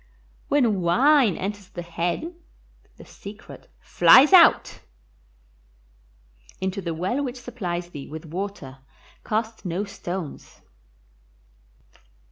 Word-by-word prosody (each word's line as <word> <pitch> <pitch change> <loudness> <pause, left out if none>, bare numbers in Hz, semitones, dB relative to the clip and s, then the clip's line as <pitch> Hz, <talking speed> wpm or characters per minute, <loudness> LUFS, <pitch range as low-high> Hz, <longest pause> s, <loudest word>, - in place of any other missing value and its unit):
When 235 -9 +1
wine 240 - +3
enters 200 0 -6
the 175 - -7
head 170 - -3 0.6
the - - -13
secret 205 +2 -12
flies 285 +8 +6
out. 350 -3 +6 1.8
Into 190 +1 -3
the 170 -3 -4
well 190 - -2
which 255 -2 -5
supplies 180 -8 -5
thee 145 -4 -9
with 160 +2 -9
water 165 -6 -7 0.4
cast 220 0 -3
no 180 +1 -3
stones. 180 -5 -8
195 Hz, 95 wpm, -24 LUFS, 175-240 Hz, 1.8 s, flies